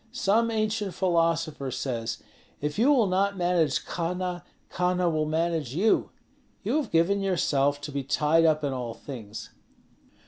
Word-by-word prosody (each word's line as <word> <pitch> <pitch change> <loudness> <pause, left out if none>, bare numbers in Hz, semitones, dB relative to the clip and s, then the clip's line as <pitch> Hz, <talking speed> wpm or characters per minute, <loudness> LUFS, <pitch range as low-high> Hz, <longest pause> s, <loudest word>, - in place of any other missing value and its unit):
Some 230 -1 +2
ancient 215 -4 -1
philosopher 165 -6 0
says, 115 -4 -3 0.4
'If 150 +5 -3
you 260 +6 +5
will 255 -6 +4
not 195 +1 +1
manage 175 -5 +1
Kahna, 180 +1 -3 0.3
Kahna 180 0 +1
will 155 -1 0
manage 160 -4 -1
you.' 210 +6 +2 0.5
You - - +1
have 305 - -1
given 180 +5 +2
yourself 145 -7 +1
to 145 - -6
be 140 0 -2
tied 150 +4 +2
up 155 -1 +3
in 140 -2 -1
all 120 -3 -4
things." 115 -6 -8
165 Hz, 145 wpm, -27 LUFS, 145-190 Hz, 0.5 s, you